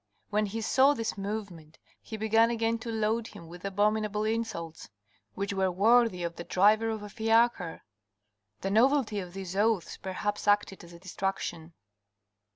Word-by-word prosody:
When 210 0 +1
he 225 +3 -4
saw 270 +5 +4
this 225 -3 -3
movement, 195 -6 -6 0.2
he 220 - -7
began 225 +1 +3
again 230 0 0
to 230 - -7
load 220 +1 0
him 170 - -12
with 175 +1 -12
abominable 210 +1 0
insults, 215 - -3 0.5
which 200 +1 -3
were 190 -1 +1
worthy 215 0 +3
of 170 0 -4
the - - -5
driver 210 +5 +3
of 220 -2 -4
a - - -6
fiacre. 225 -5 +1 0.8
The 195 - -2
novelty 235 -1 +3
of 180 -2 -7
these 190 -1 -6
oaths 210 -2 +1
perhaps 205 +2 -4
acted 205 -2 +1
as 170 - -13
a 170 - -12
distraction. 175 -2 -4
210 Hz, 160 wpm, -29 LUFS, 185-225 Hz, 0.8 s, saw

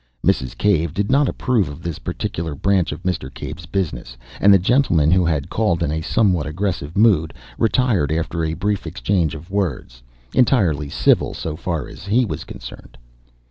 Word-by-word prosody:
Mrs. 65 -2 +1
Cave 85 -6 +1
did 100 +3 0
not 140 0 +4
approve 115 - 0
of 75 +3 -10
this 85 -3 -4
particular 80 -2 -4
branch 95 +3 +1
of 80 +4 -7
Mr. 85 -8 -2
Cave's 80 +2 -8
business, 75 -10 -3 0.2
and 100 - +6
the 100 - +8
gentleman, 90 - +3
who 90 0 +4
had 75 -4 -1
called 90 -7 +1
in 75 - 0
a 80 +1 -2
somewhat 90 -4 +1
aggressive 85 -2 -3
mood, 100 -8 +3 0.2
retired 110 - +2
after 80 +1 -1
a 80 0 -1
brief 100 +1 -2
exchange 85 -1 0
of 85 +5 -11
words 80 -11 -3 0.3
entirely 95 - +2
civil - - +2
so 80 -2 -4
far 85 -2 -3
as - - -11
he 120 +5 +3
was - - -5
concerned. - - -11
85 Hz, 175 wpm, -20 LUFS, 75-100 Hz, 0.3 s, the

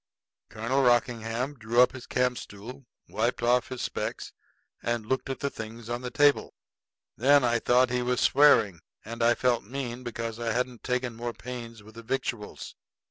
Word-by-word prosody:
Colonel 115 +5 0
Rockingham 120 +1 +1
drew 115 +2 0
up 125 - +7
his 130 -1 -10
campstool, 125 0 -3 0.2
wiped 120 +2 -1
off 120 +1 +3
his 130 -1 -5
specs, - - -4 0.5
and 120 -2 -2
looked 130 +3 -2
at 135 - -4
the 140 - -1
things 115 +1 -8
on 120 +1 -2
the 125 - -4
table. 145 +3 +3 0.6
Then 140 +3 +5
I 120 -1 +2
thought 125 +1 +3
he 125 0 0
was 125 0 0
swearing; 115 - +5 0.3
and 115 +2 -6
I 120 +1 +4
felt 120 -2 +1
mean 125 +1 -5
because 115 -2 -5
I 115 -1 -1
hadn't 125 0 -2
taken 125 -1 -1
more 120 +1 -4
pains 115 -3 -8
with 110 +1 -15
the 115 - -10
victuals. 120 -3 -4
120 Hz, 170 wpm, -28 LUFS, 115-125 Hz, 0.6 s, up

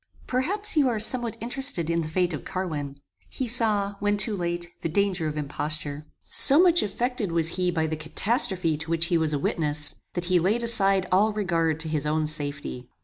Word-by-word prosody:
Perhaps 390 +12 +1
you 285 -4 +3
are 230 - -2
somewhat 230 +1 +4
interested 245 - +1
in 170 0 0
the 155 - -4
fate 180 +1 0
of 150 - -6
Carwin. 150 -7 -5 0.3
He 260 - -4
saw, 210 -4 +4
when 205 0 0
too 210 +1 +1
late, 175 -1 -3
the 165 - -2
danger 190 -2 0
of 155 0 -5
imposture. 150 0 -5 0.2
So 285 +2 +6
much 350 -1 +4
affected 215 0 -3
was 165 -1 +1
he 180 +1 -1
by 165 -2 -1
the 160 0 -3
catastrophe 175 - 0
to 160 +2 -8
which 165 0 0
he - - +4
was 160 -1 +1
a 145 - 0
witness, 150 0 -2 0.2
that 175 -1 -3
he 180 0 +2
laid 210 +8 0
aside 195 -5 +1
all 205 +4 +3
regard 165 -6 -1
to 160 - -1
his 150 -2 -2
own 155 +1 0
safety. 145 -4 -5
175 Hz, 200 wpm, -25 LUFS, 155-215 Hz, 0.3 s, So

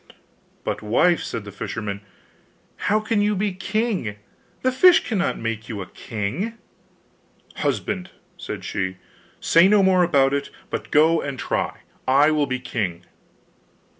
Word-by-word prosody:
'But, - - -3
wife,' 160 +11 +3
said 115 - -4
the 100 - -9
fisherman, 100 -2 -5 0.7
'how 215 +1 +1
can 220 -1 +1
you 210 0 +2
be 200 0 0
king 190 - -1 0.5
the 255 - +3
fish 345 +7 +6
cannot 195 -5 0
make 115 0 -4
you 105 - -4
a 95 - -4
king?' 120 - -4 1.0
'Husband,' 190 -3 -2 0.3
said - - -7
she, 95 -1 -2 0.4
'say 170 +3 +5
no 205 0 +5
more 190 -1 +4
about 140 -6 +3
it, 140 0 -1 0.2
but - - -4
go 160 +2 +4
and 140 -2 -4
try! - - -2 0.3
I 140 +4 +5
will 150 -2 +1
be 130 - -1
king. 110 -9 -3
155 Hz, 140 wpm, -23 LUFS, -, 1.0 s, fish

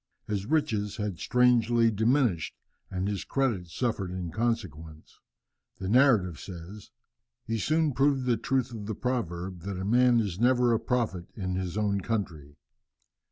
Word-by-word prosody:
His 100 -1 -3
riches 110 -10 0
had 105 -5 -3
strangely 120 -2 +3
diminished 110 - +1 0.3
and 95 +1 -2
his 100 -2 -2
credit 120 -10 -1
suffered 100 0 -2
in 90 -2 -5
consequence. 85 -8 -4 0.6
The 95 - -5
narrative 110 - +4
says, 95 +3 -9 0.6
"He 115 0 -2
soon 155 +4 +1
proved 135 0 +2
the 125 -2 +3
truth 130 +2 -1
of 105 -3 -7
the 110 - -3
proverb, 95 -8 -3
that 95 +2 -5
a 95 - -4
man 120 +2 +4
is 100 -5 -2
never 125 0 +4
a 115 - +2
prophet 115 -7 -1
in 95 -3 -3
his 95 +1 -3
own 100 -2 +1
country. 80 -10 -4
105 Hz, 150 wpm, -28 LUFS, 95-120 Hz, 0.6 s, narrative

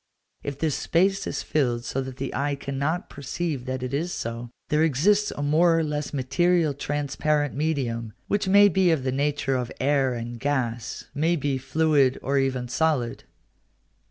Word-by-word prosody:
If 140 -1 -5
this 155 0 0
space 195 +7 +1
is - - -3
filled 120 -5 0
so 135 - -2
that 130 -1 -7
the 135 0 -4
eye 140 +2 0
cannot 140 +5 -2
perceive 140 -1 -4
that 130 -1 -3
it 125 +1 -4
is 165 +5 -1
so, 115 -2 -5 0.2
there 150 +1 +2
exists 195 +8 +3
a 145 - -4
more 165 +3 +4
or 165 - +2
less 150 -1 -3
material 160 +4 +2
transparent 145 +1 -1
medium, 125 -7 -2
which 205 -2 0
may 200 +2 +7
be 190 -1 +3
of 160 -5 +1
the 130 - 0
nature 140 0 0
of 125 -2 -2
air 135 -2 +2
and 120 0 -6
gas, 125 -4 -2
may 160 +4 +1
be 140 -3 -1
fluid 140 -1 +2
or 140 +1 +1
even 130 -2 -1
solid. 125 -2 0
145 Hz, 170 wpm, -25 LUFS, 130-160 Hz, 0.2 s, may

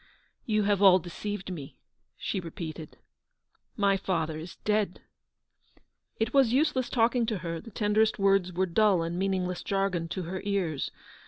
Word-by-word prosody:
"You 215 -2 +2
have 200 -1 +2
all 190 -2 +8
deceived 190 +2 -5
me/' 145 -5 -7 0.4
she - - -2
repeated; 160 -2 -7 0.8
"my 200 -2 +3
father 160 -5 -2
is 170 +2 -8
dead 210 -3 +1
I" - - -38 0.4
It 225 +1 0
was 270 -5 +5
useless 270 -2 +2
talking 235 0 +2
to 220 - -1
her; 165 -2 -4
the - - -11
tenderest 215 +1 +2
words 195 -2 +3
were 185 +2 +1
dull 190 -1 +3
and 170 +2 -3
meaningless 185 -2 -1
jargon 195 -4 -1
to 180 +2 -4
her 180 +3 -5
ears. 190 -8 -1
195 Hz, 155 wpm, -28 LUFS, 175-210 Hz, 0.8 s, all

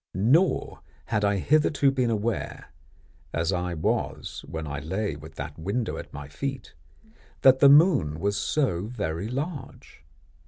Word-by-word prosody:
Nor 130 - +2 0.3
had 105 +4 -1
I 100 0 +2
hitherto 145 - +3
been 130 -3 0
aware, 110 -5 -3 0.6
as 85 +3 0
I 90 -1 -2
was 80 - -2
when 80 -1 -5
I 70 -1 -4
lay 95 +4 -2
with 80 +2 -12
that 70 +3 -7
window 100 +8 -2
at - - -8
my 70 -1 -8
feet, 135 - -5 0.7
that 130 0 +6
the 140 - +8
moon 140 - +5
was 100 +3 0
so 105 - 0
very 90 -6 -3
large. 140 - -6
105 Hz, 145 wpm, -26 LUFS, 80-135 Hz, 0.7 s, the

